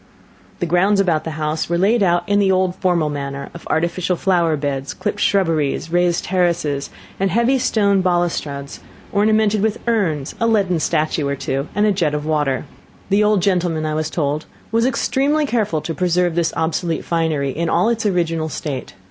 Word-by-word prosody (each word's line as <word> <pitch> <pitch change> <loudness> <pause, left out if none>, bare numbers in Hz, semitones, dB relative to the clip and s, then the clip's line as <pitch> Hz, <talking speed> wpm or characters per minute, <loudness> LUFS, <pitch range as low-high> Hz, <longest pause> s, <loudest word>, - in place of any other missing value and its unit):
The - - 0
grounds 185 +4 +2
about 170 -6 +1
the - - -2
house 155 +1 -2
were 170 - +1
laid 210 +6 +3
out 175 -2 +2
in 205 0 +2
the 195 -1 +3
old 185 -1 +2
formal 170 -5 +1
manner 140 -1 -5
of 170 - -10
artificial 170 +3 0
flower 170 -4 +1
beds, 140 -1 -3
clipped - - -3
shrubberies, 165 -5 +1
raised 175 0 +2
terraces, 170 -6 0 0.3
and 195 0 +1
heavy 235 +7 +2
stone 200 -5 +2
balustrades, 170 -6 -1 0.3
ornamented 215 0 +2
with 220 0 0
urns, 170 -12 0
a 230 - +2
leaden 195 -6 +2
statue 155 -2 0
or 140 - -1
two, 135 +1 -3
and 205 +1 +3
a 210 - +3
jet 165 -6 0
of 150 0 -3
water. 150 -3 0 0.4
The 200 +2 +3
old 210 -3 +2
gentleman, 175 -5 +1
I 155 - -1
was 155 0 -1
told, 150 -1 -2 0.2
was 230 +2 +2
extremely 280 +4 +1
careful 215 - 0
to 165 - -4
preserve 180 0 +1
this 170 -1 +1
obsolete 165 0 -1
finery 160 -5 0
in 165 +4 -2
all 180 +7 +2
its 230 -1 -1
original 165 -5 0
state. 135 - -5
175 Hz, 180 wpm, -19 LUFS, 155-200 Hz, 0.4 s, laid